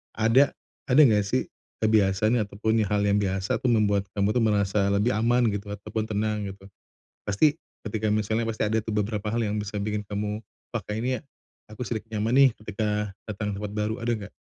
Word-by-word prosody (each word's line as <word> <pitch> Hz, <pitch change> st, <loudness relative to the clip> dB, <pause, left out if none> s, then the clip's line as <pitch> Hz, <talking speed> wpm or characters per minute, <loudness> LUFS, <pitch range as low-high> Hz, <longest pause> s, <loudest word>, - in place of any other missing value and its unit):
ada 115 Hz, +6 st, +4 dB, 0.3 s
ada 130 Hz, +4 st, +5 dB
nggak 105 Hz, -4 st, +3 dB
sih 130 Hz, +5 st, 0 dB, 0.4 s
kebiasaan, 110 Hz, +1 st, +3 dB
ataupun 110 Hz, +2 st, 0 dB
hal 105 Hz, 0 st, +1 dB
yang 100 Hz, 0 st, +3 dB
biasa 95 Hz, 0 st, -1 dB
tuh 130 Hz, -, +1 dB
membuat 105 Hz, -3 st, +2 dB
kamu 100 Hz, +1 st, +2 dB
tuh 125 Hz, -, +2 dB
merasa 100 Hz, -2 st, +2 dB
lebih 100 Hz, +4 st, +2 dB
aman 115 Hz, +2 st, +2 dB
gitu, 100 Hz, 0 st, -5 dB
ataupun 105 Hz, +2 st, -4 dB
tenang 105 Hz, -1 st, -1 dB
gitu. 95 Hz, 0 st, -11 dB, 0.6 s
Pasti, 145 Hz, +10 st, +3 dB, 0.3 s
ketika 110 Hz, -1 st, -1 dB
misalnya, 110 Hz, +2 st, 0 dB
pasti 115 Hz, -1 st, -2 dB
ada 110 Hz, -, +1 dB
tuh 110 Hz, -1 st, -4 dB
beberapa 105 Hz, 0 st, -1 dB
hal 120 Hz, -, +1 dB
yang 105 Hz, -1 st, -1 dB
bisa 105 Hz, 0 st, -3 dB
bikin 105 Hz, 0 st, -2 dB
kamu, 105 Hz, +2 st, -3 dB, 0.3 s
"Pakai 110 Hz, -2 st, -4 dB
ini 125 Hz, -, -1 dB
ya, -, -, -11 dB, 0.5 s
aku 110 Hz, +3 st, -9 dB
sedikit 115 Hz, -1 st, -5 dB
nyaman 110 Hz, +2 st, 0 dB
nih." 135 Hz, -1 st, +7 dB
ketika 105 Hz, -1 st, -2 dB, 0.2 s
datang 105 Hz, -1 st, -3 dB
ke 100 Hz, -, -7 dB
tempat 105 Hz, -, -4 dB
baru. 105 Hz, +1 st, -1 dB
Ada 120 Hz, -, 0 dB
nggak? 100 Hz, -, -13 dB
105 Hz, 190 wpm, -26 LUFS, 100-110 Hz, 0.6 s, nih